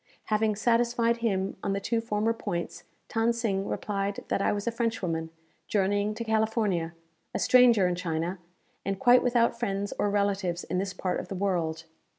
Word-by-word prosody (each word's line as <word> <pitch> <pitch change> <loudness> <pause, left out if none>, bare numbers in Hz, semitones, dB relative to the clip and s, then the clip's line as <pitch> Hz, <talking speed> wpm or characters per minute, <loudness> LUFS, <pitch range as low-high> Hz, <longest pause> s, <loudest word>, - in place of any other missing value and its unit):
Having 215 0 +2
satisfied 235 +1 +2
him 195 -5 -1
on 195 - -1
the 200 - -1
two 225 +3 -1
former 225 0 0
points, 170 -6 -5 0.3
Than 225 +1 +3
Sing 200 -5 -1
replied 200 -1 -3
that - - +1
I - - +2
was 205 -1 -2
a 235 - 0
Frenchwoman, 190 -9 -2 0.4
journeying 205 +1 +1
to 230 - -4
California, 220 -6 0 0.4
a - - +2
stranger 240 -6 +5
in 180 - 0
China, 175 +1 -2 0.4
and 195 0 -2
quite 245 +5 +6
without 235 -1 +2
friends 200 -3 -2
or 205 - +2
relatives 200 -3 0
in 180 - -2
this 195 -1 -3
part 185 -1 -1
of - - -6
the 195 - -5
world. 170 -4 -1
205 Hz, 170 wpm, -28 LUFS, 190-230 Hz, 0.4 s, quite